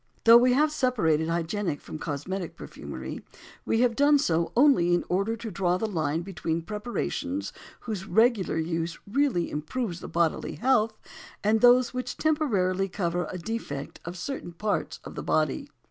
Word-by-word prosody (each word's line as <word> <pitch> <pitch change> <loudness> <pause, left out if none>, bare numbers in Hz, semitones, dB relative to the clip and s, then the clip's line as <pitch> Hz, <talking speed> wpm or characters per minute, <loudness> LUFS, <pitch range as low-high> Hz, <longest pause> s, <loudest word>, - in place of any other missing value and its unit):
Though 230 +1 +9
we 250 +1 +4
have 300 +3 +3
separated 205 - +1
hygienic 170 0 -1
from 155 - -8
cosmetic 170 +5 -4
perfumery, - - -8 0.4
we 225 - +2
have 245 -2 +3
done 290 +2 +5
so 170 - +1
only 240 -11 +5
in 175 - 0
order 200 +5 0
to 225 -1 -6
draw 180 -1 +1
the 220 - -2
line 165 -5 -1
between 170 -3 -3
preparations 240 - -3 0.3
whose 205 -5 -5
regular 220 -3 +3
use 165 +1 -2
really 240 -6 +1
improves 175 +5 -3
the - - -8
bodily 170 -2 0
health, 225 -3 +2 0.5
and 215 +1 +3
those 245 +1 +6
which 250 0 -4
temporarily 195 -12 +1
cover 175 -2 -1
a 185 - -5
defect 165 -7 -5
of 175 +2 -7
certain 180 -3 -5
parts 205 +5 -2
of - - -9
the - - -5
body. - - 0
195 Hz, 160 wpm, -27 LUFS, 170-245 Hz, 0.5 s, Though